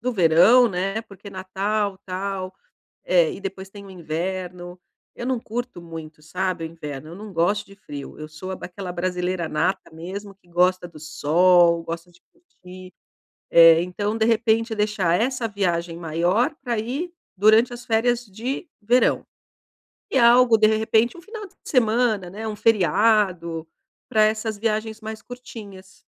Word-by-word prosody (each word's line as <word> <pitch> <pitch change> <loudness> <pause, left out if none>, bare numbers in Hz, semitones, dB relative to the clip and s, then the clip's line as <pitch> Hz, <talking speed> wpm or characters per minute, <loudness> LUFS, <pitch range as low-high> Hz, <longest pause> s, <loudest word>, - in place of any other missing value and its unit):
do 250 +2 -1
verão, 195 +7 +6
né, 195 +4 -2
porque 200 -1 -13
natal, 195 +1 -2
tal, 190 0 -4 0.5
eh, 175 -3 +3
e - - -10
depois 195 0 -6
tem 200 0 -11
o 195 - -12
inverno. 180 +1 -5 0.3
Eu 240 - -6
não 260 -2 0
curto 240 -2 -5
muito, 160 -2 -10
sabe, 180 +2 -2
o - - -2
inverno, 155 -3 -8
eu - - -9
não 205 +1 -9
gosto 200 +5 +1
de 200 - -15
frio, 145 -7 -9
eu 155 - -6
sou 155 +5 -8
aquela 185 0 -7
brasileira 180 -1 -2
nata 185 +5 -1
mesmo 195 +5 -7
que 185 -2 -31
gosta 180 +1 +2
do 160 -3 -14
sol, 170 +3 +3
gosta 165 +1 -6
de 175 - -24
curtir. 185 - -14 0.6
Eh, 165 0 +8
então 205 +4 -2
de 220 - +1
repente 225 0 +2
deixar 210 -4 +1
essa 245 -1 0
viagem 175 -4 -1
maior 175 - +1
pra 240 -3 -2
ir 275 +11 -3 0.2
durante 220 +5 +5
as 240 0 -10
férias 240 +1 +1
de 235 - -5
verão. 240 +4 +2 0.8
E 265 - +2
algo 235 -1 +6
de 215 - +5
repente 220 +3 +2
um 345 - -12
final 425 0 -8
de - - -29
semana, 225 -6 +1
né, 215 +4 -6
um 215 - -3
feriado, 190 -5 +2 0.4
pra 220 -3 +4
essas 215 0 0
viagens 220 0 -2
mais 220 0 -7
curtinhas. 210 -7 -11
195 Hz, 155 wpm, -23 LUFS, 175-225 Hz, 0.8 s, Eh